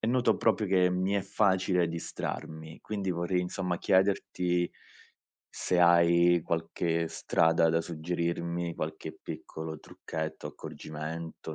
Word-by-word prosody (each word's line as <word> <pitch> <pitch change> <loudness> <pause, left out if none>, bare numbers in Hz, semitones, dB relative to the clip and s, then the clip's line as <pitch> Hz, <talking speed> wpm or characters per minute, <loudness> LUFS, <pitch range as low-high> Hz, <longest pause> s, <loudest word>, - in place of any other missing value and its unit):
e 110 - -1
noto 125 0 +3
proprio 110 -2 +2
che 90 -1 +4
mi 90 +2 0
è 100 - +2
facile 95 -3 +2
distrarmi. 80 -1 -6
Quindi 100 -3 -3
vorrei, 85 +1 0
insomma, 90 0 -2
chiederti 90 -2 +2 0.9
se 90 - 0
hai 85 0 +5
qualche 85 0 -1
strada 80 +1 +3
da 80 +1 +2
suggerirmi, 85 +1 -2
qualche 80 0 -5
piccolo 80 -1 -6
trucchetto, 80 0 -6
accorgimento, 80 +1 -7
85 Hz, 115 wpm, -30 LUFS, 80-90 Hz, 0.9 s, hai